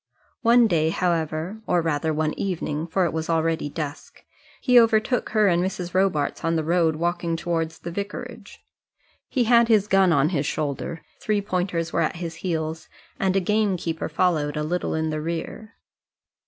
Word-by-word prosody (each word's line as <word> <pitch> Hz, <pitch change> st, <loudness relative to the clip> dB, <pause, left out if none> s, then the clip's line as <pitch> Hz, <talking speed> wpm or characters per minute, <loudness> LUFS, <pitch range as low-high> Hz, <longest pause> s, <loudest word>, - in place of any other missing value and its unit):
One 235 Hz, 0 st, +5 dB
day, 160 Hz, -6 st, +2 dB
however 170 Hz, +3 st, -1 dB
or 175 Hz, -, +3 dB
rather, 160 Hz, 0 st, 0 dB
one 155 Hz, 0 st, 0 dB
evening, 165 Hz, -4 st, -3 dB
for 180 Hz, +2 st, +1 dB
it 170 Hz, -, -2 dB
was 160 Hz, 0 st, -3 dB
already 165 Hz, -2 st, 0 dB
dusk 145 Hz, -1 st, -7 dB, 0.4 s
he 250 Hz, -2 st, +6 dB
overtook 230 Hz, +2 st, +2 dB
her 215 Hz, -2 st, +3 dB
and 175 Hz, -1 st, +2 dB
Mrs. 180 Hz, -2 st, -4 dB
Robarts 185 Hz, -6 st, +1 dB
on 165 Hz, 0 st, +1 dB
the 160 Hz, -, 0 dB
road 165 Hz, -1 st, +2 dB
walking 170 Hz, 0 st, -1 dB
towards 165 Hz, -1 st, -2 dB
the 170 Hz, -, -7 dB
vicarage. 205 Hz, +3 st, -7 dB, 0.6 s
He 255 Hz, -, +1 dB
had 235 Hz, 0 st, +5 dB
his 215 Hz, -3 st, +3 dB
gun 195 Hz, -3 st, +4 dB
on 150 Hz, -1 st, +3 dB
his 150 Hz, -5 st, -1 dB
shoulder, 155 Hz, +2 st, -3 dB, 0.2 s
three 210 Hz, -1 st, 0 dB
pointers 180 Hz, -4 st, -2 dB
were 170 Hz, -, +2 dB
at 160 Hz, -, 0 dB
his 165 Hz, -1 st, -6 dB
heels, 160 Hz, -2 st, -3 dB, 0.3 s
and 190 Hz, -1 st, +1 dB
a -, -, +4 dB
gamekeeper 185 Hz, -5 st, -1 dB
followed 155 Hz, -3 st, 0 dB
a 150 Hz, -, -1 dB
little 175 Hz, +3 st, -2 dB
in 160 Hz, 0 st, -1 dB
the 155 Hz, 0 st, -3 dB
rear. 170 Hz, +7 st, -5 dB
170 Hz, 170 wpm, -24 LUFS, 160-195 Hz, 0.6 s, he